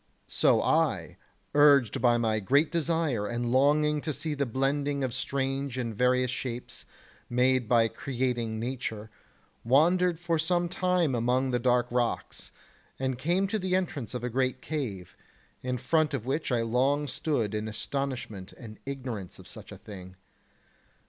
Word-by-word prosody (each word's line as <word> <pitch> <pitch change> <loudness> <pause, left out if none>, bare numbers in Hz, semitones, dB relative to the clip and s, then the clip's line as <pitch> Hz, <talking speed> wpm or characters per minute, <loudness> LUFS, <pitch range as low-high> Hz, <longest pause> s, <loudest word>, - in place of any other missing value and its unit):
so - - +3
I, - - +1 0.4
urged 140 -7 +5
by 120 -1 +4
my 110 -2 +1
great 140 - +2
desire 160 -9 0
and 120 +1 -2
longing 150 +3 +3
to 155 - -2
see 150 +3 -2
the 140 -2 -1
blending 140 +3 0
of 130 -2 -2
strange 135 0 -2
and 115 -3 -3
various 125 +2 +2
shapes 125 -2 -5 0.4
made 125 -1 +2
by 115 -2 +5
creating 120 -3 -2
nature, 110 -3 -4 0.5
wandered 170 +7 +3
for 170 -2 0
some 175 +2 +1
time 180 -4 +1
among 125 +2 +1
the 125 - +1
dark 120 0 +3
rocks, 120 -1 -2 0.5
and 130 -2 -2
came 175 +7 +1
to 215 - -1
the 185 -1 0
entrance 145 - -2
of 120 - -4
a 125 - -1
great 130 +1 0
cave, 105 - -5 0.5
in 125 0 -2
front 155 +2 +1
of 120 -4 -5
which 140 +3 -1
I 120 -2 +2
long 135 +6 +1
stood 135 -10 -1
in 105 0 -2
astonishment 115 -4 -4
and 110 -3 -11
ignorance 125 -9 -5
of - - -14
such - - -11
a - - -9
thing. 95 -3 -11
130 Hz, 155 wpm, -28 LUFS, 120-145 Hz, 0.5 s, urged